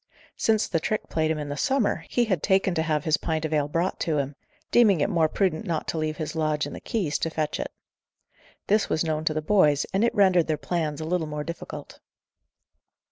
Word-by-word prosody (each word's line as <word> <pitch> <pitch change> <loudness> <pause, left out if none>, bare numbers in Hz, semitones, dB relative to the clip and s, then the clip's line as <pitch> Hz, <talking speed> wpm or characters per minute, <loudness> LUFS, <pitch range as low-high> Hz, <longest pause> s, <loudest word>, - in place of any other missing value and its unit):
Since 220 -1 +2
the 165 - 0
trick 215 +6 -2
played 160 -1 0
him 160 - 0
in 145 -1 -5
the 145 - -3
summer, 265 - 0
he 245 - +2
had 185 -8 0
taken 190 -1 +2
to 160 - 0
have 155 -2 0
his 155 -2 +2
pint 160 -1 -2
of 155 - -2
ale 145 -2 +2
brought 170 +5 -1
to 155 -2 0
him; 140 0 -2 0.4
deeming 210 -8 +5
it 150 - +1
more 165 -4 +3
prudent 190 -1 0
not 165 -3 -2
to 160 - -1
leave 155 0 -2
his 155 0 -4
lodge 155 -1 0
and - - -7
the - - -7
keys, 185 -10 -1
to 165 - -1
fetch 155 -1 -2
it. - - -4 0.9
This 210 +1 +2
was 155 - +1
known 155 -1 -2
to 155 - +2
the 155 - -1
boys, 150 -6 +3
and 195 +3 +2
it 235 0 +1
rendered 185 -5 +4
their 155 -1 0
plans 155 0 -2
a - - -3
little 165 -1 -1
more 150 0 -4
difficult. 170 +2 -8
160 Hz, 230 wpm, -26 LUFS, 155-190 Hz, 0.9 s, deeming